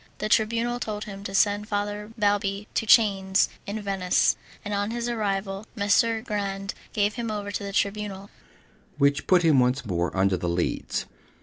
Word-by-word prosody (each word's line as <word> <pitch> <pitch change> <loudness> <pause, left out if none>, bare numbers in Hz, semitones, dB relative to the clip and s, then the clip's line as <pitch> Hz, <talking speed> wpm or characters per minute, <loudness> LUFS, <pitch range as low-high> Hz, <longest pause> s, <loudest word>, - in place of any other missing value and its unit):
The 215 - -3
Tribunal 230 +3 +1
told 210 -2 -4
him 195 -1 -8
to 195 - -4
send 205 +1 +2
Father 205 0 -3
Balbi 205 -1 +1
in 225 - 0
chains 195 -4 +4 0.2
to 210 +2 -3
Venice, 190 -2 +2 0.3
and 205 - -3
on 205 +1 0
his 235 +1 -3
arrival 200 -3 -2
Messer 220 +2 +2
Grande 195 -3 -3 0.2
gave 205 0 +1
him 235 0 -4
over 205 -1 -3
to 205 - -3
the 200 - -4
Tribunal, 200 0 -2 0.7
which 140 0 +2
put 180 -2 +5
him 155 -5 +5
once 125 +1 +1
more 90 -2 -1
under 95 -1 +3
the 90 0 -2
Leads. 85 0 -1
205 Hz, 170 wpm, -26 LUFS, 195-210 Hz, 0.7 s, put